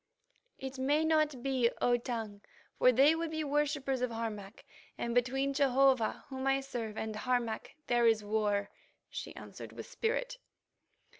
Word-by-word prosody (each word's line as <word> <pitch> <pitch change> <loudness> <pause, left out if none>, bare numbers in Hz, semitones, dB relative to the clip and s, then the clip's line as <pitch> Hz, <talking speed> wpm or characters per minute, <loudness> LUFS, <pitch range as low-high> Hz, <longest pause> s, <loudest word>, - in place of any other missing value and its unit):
"It 265 0 -6
may 290 +4 +2
not 305 -5 +2
be, 260 -3 +2
O 245 - +3
Tongue, 225 -4 -4 0.4
for 255 - +7
they 275 +5 +6
would 330 0 -2
be 315 0 -2
worshippers 285 -2 0
of 250 - +1
Harmac, 220 -3 -5 0.3
and 235 - -2
between 265 +3 +1
Jehovah, 270 -3 +3
whom 265 0 -3
I 270 0 +3
serve, 230 -5 -5
and 220 -1 -3
Harmac 235 0 -1
there 240 -1 +3
is 220 -2 +3
war," 205 -1 0 0.4
she - - -6
answered - - -9
with - - -7
spirit. - - -2
255 Hz, 150 wpm, -32 LUFS, 230-275 Hz, 0.4 s, for